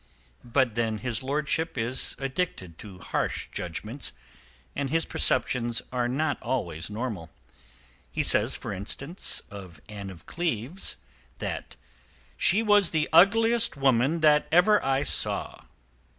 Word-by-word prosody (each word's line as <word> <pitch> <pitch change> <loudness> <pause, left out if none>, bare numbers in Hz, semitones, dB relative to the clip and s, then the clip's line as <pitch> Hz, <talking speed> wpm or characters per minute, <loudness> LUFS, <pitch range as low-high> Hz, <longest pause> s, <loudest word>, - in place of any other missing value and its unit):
But 120 -1 +1
then 110 -1 -1
his 115 +1 -3
lordship 150 +3 -1
is 120 +2 0
addicted 135 - -3
to 100 -4 -10
harsh - - -2
judgments 100 - -4 0.6
and 140 -1 -2
his 165 +3 +1
perceptions 120 -2 +1
are 125 -1 +1
not 145 +4 -1
always 85 -10 -3
normal. 105 -7 -4 0.8
He - - -1
says, - - +3
for - - -5
instance, 135 - -3
of 95 -6 -10
Anne 100 -2 -7
of 90 -3 -12
Cleves, 165 - -3 0.4
that - - -5 0.6
she 215 +3 +3
was 205 -4 +5
the 155 -1 0
"ugliest 225 +4 +5
woman 135 +4 +2
that 150 -1 +4
ever 195 +6 +5
I 135 +1 +1
saw." - - 0
130 Hz, 125 wpm, -27 LUFS, 105-160 Hz, 0.8 s, was